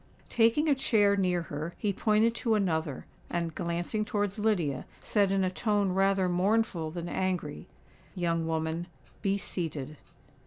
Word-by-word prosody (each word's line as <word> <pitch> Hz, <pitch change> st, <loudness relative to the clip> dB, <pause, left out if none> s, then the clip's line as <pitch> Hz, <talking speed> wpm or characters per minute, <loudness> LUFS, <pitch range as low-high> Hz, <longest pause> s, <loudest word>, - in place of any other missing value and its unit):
Taking 230 Hz, +7 st, +3 dB
a 295 Hz, -, +5 dB
chair 210 Hz, -7 st, +3 dB
near 180 Hz, -3 st, +1 dB
her, 155 Hz, +2 st, -5 dB
he 205 Hz, -1 st, 0 dB
pointed 215 Hz, +3 st, +3 dB
to 225 Hz, -2 st, +1 dB
another, 160 Hz, -8 st, -1 dB, 0.2 s
and, 170 Hz, -1 st, -2 dB
glancing 175 Hz, +7 st, -2 dB
towards 205 Hz, -1 st, -2 dB
Lydia, 175 Hz, -11 st, 0 dB
said 200 Hz, -3 st, +1 dB
in 195 Hz, -1 st, +2 dB
a 185 Hz, -, +1 dB
tone 205 Hz, -1 st, +1 dB
rather 195 Hz, 0 st, +2 dB
mournful 180 Hz, -2 st, +1 dB
than 170 Hz, +1 st, -5 dB
angry, 180 Hz, -, -2 dB, 0.5 s
"Young 165 Hz, -2 st, 0 dB
woman, 160 Hz, +1 st, -2 dB, 0.3 s
be 200 Hz, -1 st, +1 dB
seated." 155 Hz, -7 st, -4 dB
185 Hz, 145 wpm, -29 LUFS, 165-210 Hz, 0.5 s, a